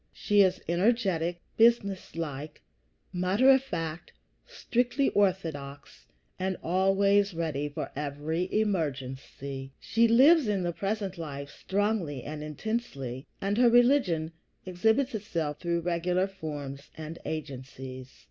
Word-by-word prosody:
She 205 Hz, -1 st, +3 dB
is 185 Hz, -2 st, +3 dB
energetic, 175 Hz, -2 st, +1 dB
businesslike, 180 Hz, -, +1 dB, 0.5 s
matter 190 Hz, +9 st, +4 dB
of 265 Hz, -1 st, +5 dB
fact, 165 Hz, -10 st, -5 dB, 0.4 s
strictly 245 Hz, +3 st, 0 dB
orthodox, 160 Hz, -8 st, -2 dB, 0.3 s
and 190 Hz, 0 st, -1 dB
always 195 Hz, +2 st, +3 dB
ready 150 Hz, -3 st, -2 dB
for 145 Hz, -, -5 dB
every 150 Hz, +5 st, -3 dB
emergency. 135 Hz, -7 st, -2 dB
She 230 Hz, +1 st, +2 dB
lives 270 Hz, +5 st, +6 dB
in 200 Hz, -3 st, 0 dB
the 175 Hz, -1 st, -1 dB
present 195 Hz, -1 st, -3 dB
life 140 Hz, -3 st, -6 dB
strongly 195 Hz, -, -1 dB
and 150 Hz, +1 st, -6 dB
intensely, 150 Hz, -, -4 dB
and 200 Hz, +3 st, 0 dB
her 245 Hz, -1 st, +6 dB
religion 240 Hz, -, +3 dB, 0.3 s
exhibits 220 Hz, +9 st, +1 dB
itself 165 Hz, -8 st, -3 dB
through 170 Hz, -1 st, -1 dB
regular 180 Hz, +2 st, +1 dB
forms 145 Hz, -7 st, -7 dB
and 160 Hz, +1 st, -7 dB
agencies. 130 Hz, -3 st, -6 dB
175 Hz, 110 wpm, -29 LUFS, 150-205 Hz, 0.5 s, lives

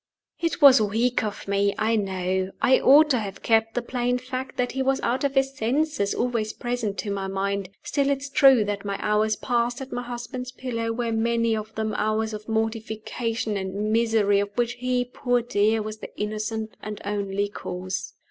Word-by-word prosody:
It 335 Hz, -2 st, -1 dB
was 270 Hz, -4 st, +9 dB
weak 225 Hz, +4 st, +1 dB
of 210 Hz, -2 st, -5 dB
me, 200 Hz, 0 st, +1 dB
I 220 Hz, +1 st, +2 dB
know; 190 Hz, -2 st, -1 dB
I 260 Hz, -, +4 dB
ought 300 Hz, +3 st, +6 dB
to 250 Hz, -, +3 dB
have 200 Hz, -3 st, -6 dB
kept 225 Hz, 0 st, +2 dB
the 245 Hz, -, 0 dB
plain 245 Hz, 0 st, 0 dB
fact 255 Hz, +1 st, -6 dB
that 245 Hz, 0 st, 0 dB
he 265 Hz, -, -2 dB
was 270 Hz, 0 st, +1 dB
out 250 Hz, +3 st, 0 dB
of 280 Hz, 0 st, 0 dB
his 270 Hz, 0 st, +2 dB
senses 265 Hz, -2 st, 0 dB
always 230 Hz, -3 st, -1 dB
present 240 Hz, -5 st, -3 dB
to 200 Hz, +3 st, -3 dB
my 195 Hz, -1 st, -2 dB
mind: 195 Hz, 0 st, -2 dB
still 280 Hz, -1 st, 0 dB
it 280 Hz, -, +2 dB
is 280 Hz, +1 st, -7 dB
true 265 Hz, -6 st, +6 dB
that 205 Hz, -1 st, -3 dB
my 200 Hz, -1 st, -3 dB
hours 215 Hz, +1 st, +1 dB
passed 240 Hz, +1 st, 0 dB
at 265 Hz, 0 st, -7 dB
my 245 Hz, -, -2 dB
husband's 245 Hz, +1 st, -6 dB
pillow 230 Hz, -3 st, -3 dB
were 230 Hz, 0 st, -2 dB
many 230 Hz, 0 st, +1 dB
of 215 Hz, 0 st, -6 dB
them 220 Hz, -1 st, -2 dB
hours 215 Hz, +1 st, 0 dB
of 215 Hz, +1 st, -7 dB
mortification 225 Hz, 0 st, -2 dB
and 200 Hz, +2 st, -2 dB
misery 220 Hz, -3 st, +3 dB
of 200 Hz, 0 st, -1 dB
which 240 Hz, 0 st, 0 dB
he, 250 Hz, 0 st, -1 dB
poor 245 Hz, 0 st, 0 dB
dear, 220 Hz, -1 st, +2 dB
was 215 Hz, 0 st, -6 dB
the -, -, -8 dB
innocent 215 Hz, +1 st, -3 dB
and 210 Hz, -1 st, -6 dB
only 200 Hz, 0 st, -1 dB
cause. 185 Hz, -2 st, -5 dB
225 Hz, 195 wpm, -25 LUFS, 210-250 Hz, -, was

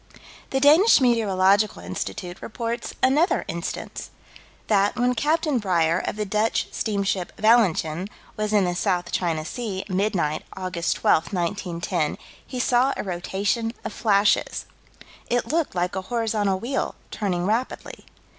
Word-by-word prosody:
The 270 Hz, -, 0 dB
Danish 310 Hz, +10 st, +6 dB
Meteorological 205 Hz, -4 st, +3 dB
Institute 95 Hz, -, -5 dB
reports 230 Hz, +1 st, -4 dB
another 295 Hz, +8 st, +3 dB
instance: 170 Hz, +1 st, -5 dB, 0.6 s
That, 205 Hz, -1 st, +2 dB
when 245 Hz, 0 st, +2 dB
Capt. 310 Hz, +7 st, +1 dB
Breyer, 185 Hz, -, +1 dB
of -, -, -5 dB
the 210 Hz, 0 st, -2 dB
Dutch 210 Hz, +3 st, 0 dB
steamer 205 Hz, -3 st, -1 dB, 0.3 s
Valentijn, 190 Hz, -6 st, +3 dB, 0.3 s
was 215 Hz, 0 st, -2 dB
in 205 Hz, -3 st, +3 dB
the 175 Hz, -, 0 dB
South 175 Hz, 0 st, -1 dB
China 165 Hz, -3 st, -1 dB
Sea, 200 Hz, -1 st, -4 dB
midnight, 185 Hz, -6 st, 0 dB, 0.2 s
Aug. 185 Hz, -1 st, -4 dB
12, 170 Hz, -1 st, +1 dB
1910, 175 Hz, -3 st, -2 dB, 0.3 s
he 255 Hz, -, -6 dB
saw 250 Hz, +2 st, +2 dB
a -, -, -3 dB
rotation 200 Hz, +5 st, -2 dB
of -, -, -4 dB
flashes. 205 Hz, -2 st, +2 dB, 0.6 s
"It 245 Hz, 0 st, +1 dB
looked 320 Hz, -, 0 dB
like 180 Hz, +1 st, -1 dB
a 190 Hz, -, -1 dB
horizontal 210 Hz, -2 st, 0 dB
wheel, 255 Hz, +6 st, -2 dB, 0.2 s
turning 180 Hz, -4 st, -1 dB
rapidly." 225 Hz, +6 st, -2 dB
205 Hz, 130 wpm, -24 LUFS, 180-235 Hz, 0.6 s, Danish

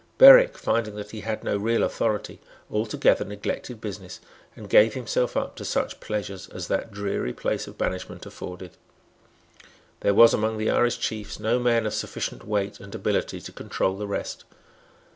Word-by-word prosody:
Berwick, -, -, +9 dB
finding 110 Hz, -3 st, -1 dB
that 105 Hz, 0 st, -7 dB
he 110 Hz, -, -7 dB
had 110 Hz, +1 st, -4 dB
no -, -, 0 dB
real 115 Hz, +3 st, +1 dB
authority, 110 Hz, -2 st, -1 dB, 0.3 s
altogether 105 Hz, +1 st, +2 dB
neglected 105 Hz, +3 st, -5 dB
business, 105 Hz, -4 st, -7 dB, 0.4 s
and -, -, -10 dB
gave 110 Hz, +1 st, +5 dB
himself 125 Hz, -1 st, -1 dB
up -, -, -2 dB
to -, -, -7 dB
such -, -, -2 dB
pleasures 100 Hz, -3 st, -5 dB
as 90 Hz, -1 st, -7 dB
that 95 Hz, -, -1 dB
dreary 100 Hz, -10 st, -3 dB
place -, -, -2 dB
of -, -, -12 dB
banishment 95 Hz, -, -4 dB
afforded. 90 Hz, 0 st, -8 dB, 1.3 s
There 100 Hz, -, +2 dB
was 115 Hz, +2 st, +8 dB
among 110 Hz, +1 st, 0 dB
the 110 Hz, 0 st, 0 dB
Irish 120 Hz, 0 st, +2 dB
chiefs 110 Hz, -2 st, -4 dB
no 115 Hz, +3 st, +1 dB
man 120 Hz, -2 st, +2 dB
of 105 Hz, -, -2 dB
sufficient -, -, -4 dB
weight 105 Hz, -1 st, -1 dB
and 100 Hz, +2 st, -10 dB
ability 105 Hz, -1 st, -1 dB
to -, -, -9 dB
control 95 Hz, -, -2 dB
the 105 Hz, +1 st, -5 dB
rest. 100 Hz, -, -4 dB
105 Hz, 165 wpm, -25 LUFS, 100-115 Hz, 1.3 s, Berwick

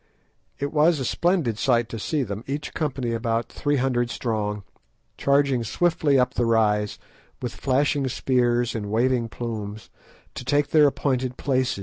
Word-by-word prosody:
It 140 Hz, +2 st, -3 dB
was 155 Hz, +1 st, +4 dB
a 130 Hz, -, -2 dB
splendid 165 Hz, -, +1 dB
sight 120 Hz, +1 st, +2 dB
to 115 Hz, -, -5 dB
see 145 Hz, +6 st, -1 dB
them, 105 Hz, -1 st, -5 dB
each 145 Hz, +2 st, -4 dB
company 135 Hz, -6 st, -2 dB
about 115 Hz, 0 st, -1 dB
three 145 Hz, 0 st, -1 dB
hundred 125 Hz, -2 st, +1 dB
strong, 105 Hz, -4 st, -2 dB, 0.5 s
charging 140 Hz, -3 st, +2 dB
swiftly 155 Hz, +2 st, +2 dB
up 125 Hz, 0 st, +2 dB
the 120 Hz, -, 0 dB
rise, 105 Hz, -2 st, +2 dB, 0.4 s
with 125 Hz, -, -4 dB
flashing 140 Hz, +1 st, +1 dB
spears 120 Hz, -2 st, +1 dB
and 105 Hz, -3 st, -4 dB
waving 120 Hz, +1 st, +1 dB
plumes, 110 Hz, -3 st, -6 dB, 0.4 s
to -, -, -7 dB
take 145 Hz, +2 st, +1 dB
their 150 Hz, -1 st, +6 dB
appointed 130 Hz, -3 st, -1 dB
place. 130 Hz, -5 st, 0 dB
125 Hz, 150 wpm, -24 LUFS, 115-140 Hz, 0.5 s, their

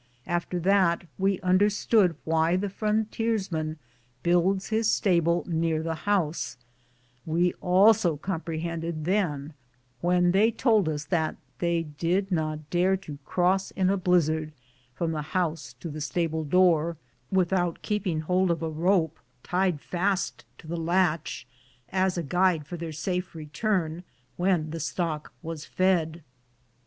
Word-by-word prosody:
After 175 Hz, +1 st, -2 dB
that 185 Hz, -2 st, +3 dB, 0.2 s
we 195 Hz, 0 st, +1 dB
understood 195 Hz, 0 st, +3 dB
why 160 Hz, +2 st, +2 dB
the 195 Hz, +1 st, -1 dB
frontiers 215 Hz, -1 st, -1 dB
man 155 Hz, -1 st, -2 dB, 0.5 s
builds 180 Hz, +3 st, +2 dB
his 220 Hz, 0 st, +2 dB
stable 170 Hz, -3 st, +2 dB
near 165 Hz, -2 st, 0 dB
the 165 Hz, 0 st, -1 dB, 0.2 s
house; 170 Hz, -10 st, 0 dB, 0.7 s
we 175 Hz, +2 st, +1 dB
also 185 Hz, -2 st, +4 dB
compre 165 Hz, -1 st, -3 dB
hended 165 Hz, -1 st, -4 dB
then 165 Hz, -6 st, 0 dB, 0.5 s
when 175 Hz, +2 st, +3 dB
they 205 Hz, +5 st, +4 dB
told 220 Hz, -7 st, +2 dB
us 150 Hz, -1 st, -3 dB
that 160 Hz, -4 st, 0 dB, 0.2 s
they 170 Hz, -1 st, +1 dB
did 170 Hz, +6 st, -1 dB
not 155 Hz, -3 st, -2 dB
dare 185 Hz, +2 st, +3 dB
to 150 Hz, -7 st, -9 dB
cross 185 Hz, +2 st, +1 dB
in 190 Hz, -1 st, +1 dB
a -, -, +2 dB
blizzard 160 Hz, -4 st, +1 dB, 0.4 s
from 170 Hz, -1 st, -1 dB
the 155 Hz, -2 st, -2 dB, 0.2 s
house 165 Hz, -3 st, -2 dB
to -, -, -5 dB
the 155 Hz, -1 st, -6 dB
stable 160 Hz, +1 st, -1 dB
door 170 Hz, 0 st, +3 dB, 0.3 s
without 180 Hz, -2 st, +1 dB
keeping 185 Hz, -7 st, -1 dB
hold 180 Hz, +3 st, +1 dB
of 165 Hz, -1 st, 0 dB
a 160 Hz, -, -1 dB
rope 165 Hz, 0 st, +1 dB, 0.2 s
tied 180 Hz, -3 st, 0 dB
fast 185 Hz, +5 st, -1 dB
to -, -, -15 dB
the 170 Hz, +2 st, -4 dB
latch 165 Hz, -4 st, 0 dB, 0.4 s
as 185 Hz, -1 st, +1 dB
a 170 Hz, -, -1 dB
guide 175 Hz, 0 st, +2 dB
for 175 Hz, -, -6 dB
their 165 Hz, -1 st, -5 dB
safe 180 Hz, +3 st, -3 dB
return 160 Hz, +2 st, -2 dB, 0.3 s
when 175 Hz, -4 st, +1 dB
the 165 Hz, -, -4 dB
stock 160 Hz, -1 st, -3 dB
was 160 Hz, -2 st, -5 dB
fed. 170 Hz, -3 st, 0 dB
175 Hz, 140 wpm, -27 LUFS, 160-190 Hz, 0.7 s, also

